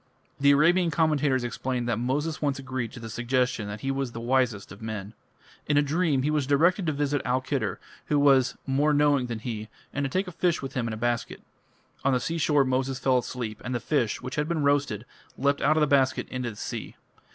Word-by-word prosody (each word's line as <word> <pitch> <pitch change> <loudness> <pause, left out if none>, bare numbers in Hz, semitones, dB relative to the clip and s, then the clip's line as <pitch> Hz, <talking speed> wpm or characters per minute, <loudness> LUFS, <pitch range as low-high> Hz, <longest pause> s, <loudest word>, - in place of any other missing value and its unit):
The 140 0 +4
Arabian 170 +5 +4
commentators 150 -5 +2
explain 125 0 -2
that 115 -2 0
Moses 145 +6 -1
once 145 -2 0
agreed 130 -3 -4
to 125 - -8
the 115 - -7
suggestion 120 -1 0
that 105 +1 -6
he 135 - -1
was 135 -3 -2
the 115 - -5
wisest 120 -5 0
of 100 - -11
men. 110 -2 -5 0.5
In 145 - +2
a 145 - +5
dream 150 -2 +1
he 150 - +1
was 150 -3 0
directed 170 +6 +3
to - - +3
visit 145 -1 0
Al 125 0 +1
Khedr, 130 -7 -2 0.3
who 150 - +2
was 135 -3 +4
"more 145 +2 +2
knowing 145 -3 +3
than 120 -2 -3
he", 110 -1 -5 0.2
and 145 - -1
to 135 - -1
take 185 +6 -1
a - - -5
fish 175 0 +1
with 135 - -6
him 120 -3 -1
in 115 - -3
a - - -5
basket. 120 +1 -2 0.6
On 135 - +3
the 125 - +2
seashore 150 -1 +2
Moses 130 +1 0
fell 130 -1 +2
asleep, 120 -3 -5
and 125 +1 -3
the - - 0
fish, 120 -3 -1
which 130 - -5
had 150 0 0
been 165 -3 -1
roasted, 140 -6 +1 0.3
leapt 140 +2 +1
out 155 +3 +3
of - - +3
the - - +5
basket 135 -2 +2
into 125 -1 -3
the 110 - -9
sea. - - -6
135 Hz, 225 wpm, -27 LUFS, 120-145 Hz, 0.6 s, a